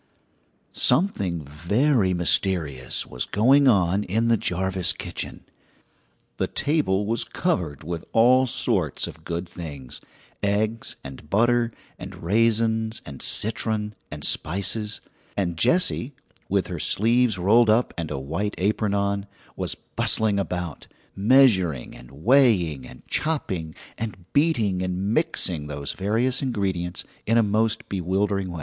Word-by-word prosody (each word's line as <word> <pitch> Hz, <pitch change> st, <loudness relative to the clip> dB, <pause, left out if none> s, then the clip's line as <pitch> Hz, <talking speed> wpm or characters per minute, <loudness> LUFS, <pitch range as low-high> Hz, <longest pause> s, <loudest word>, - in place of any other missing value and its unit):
Something 100 Hz, -, +1 dB
very 95 Hz, -, +1 dB
mysterious 85 Hz, -7 st, +1 dB
was 60 Hz, -, -4 dB
going 135 Hz, +7 st, +4 dB
on 100 Hz, -3 st, +3 dB
in 115 Hz, +5 st, 0 dB
the 115 Hz, -, +5 dB
Jarvis 95 Hz, -2 st, 0 dB
kitchen. -, -, -6 dB, 0.9 s
The -, -, 0 dB
table 140 Hz, -10 st, 0 dB
was 115 Hz, +3 st, 0 dB
covered 85 Hz, -, -2 dB
with 85 Hz, +1 st, -5 dB
all 130 Hz, +3 st, +5 dB
sorts -, -, -1 dB
of -, -, -10 dB
good 85 Hz, +1 st, -4 dB
things 70 Hz, -8 st, -9 dB, 0.4 s
eggs 105 Hz, +3 st, -1 dB
and 70 Hz, +3 st, -10 dB
butter 120 Hz, +3 st, +2 dB, 0.3 s
and -, -, -8 dB
raisins 110 Hz, +3 st, +1 dB
and 70 Hz, -2 st, -9 dB
citron 110 Hz, -1 st, -1 dB, 0.2 s
and 75 Hz, -1 st, -8 dB
spices; 105 Hz, +5 st, 0 dB, 0.4 s
and 90 Hz, -4 st, -1 dB
Jessie, 140 Hz, -, +2 dB, 0.3 s
with -, -, +1 dB
her -, -, -5 dB
sleeves 115 Hz, 0 st, +2 dB
rolled 110 Hz, +6 st, +4 dB
up 115 Hz, +3 st, +2 dB
and 85 Hz, -3 st, -4 dB
a 75 Hz, -, -3 dB
white 80 Hz, +10 st, -3 dB
apron 100 Hz, +1 st, 0 dB
on, 100 Hz, 0 st, -1 dB, 0.3 s
was -, -, -2 dB
bustling 105 Hz, -2 st, 0 dB
about, 90 Hz, -5 st, -4 dB, 0.3 s
measuring 95 Hz, -, +3 dB
and -, -, -13 dB
weighing 85 Hz, -, +2 dB
and 65 Hz, -, -15 dB
chopping 95 Hz, -, -2 dB, 0.2 s
and 105 Hz, -5 st, -5 dB
beating 115 Hz, -, +2 dB
and 95 Hz, +3 st, -2 dB
mixing 90 Hz, -, 0 dB
those 70 Hz, -1 st, -4 dB
various 115 Hz, +6 st, 0 dB
ingredients 95 Hz, -9 st, -2 dB, 0.2 s
in 115 Hz, +2 st, +3 dB
a 115 Hz, -, +5 dB
most 110 Hz, +2 st, 0 dB
bewildering 95 Hz, +1 st, -1 dB
way. 85 Hz, -, -6 dB
100 Hz, 130 wpm, -24 LUFS, 85-115 Hz, 0.9 s, the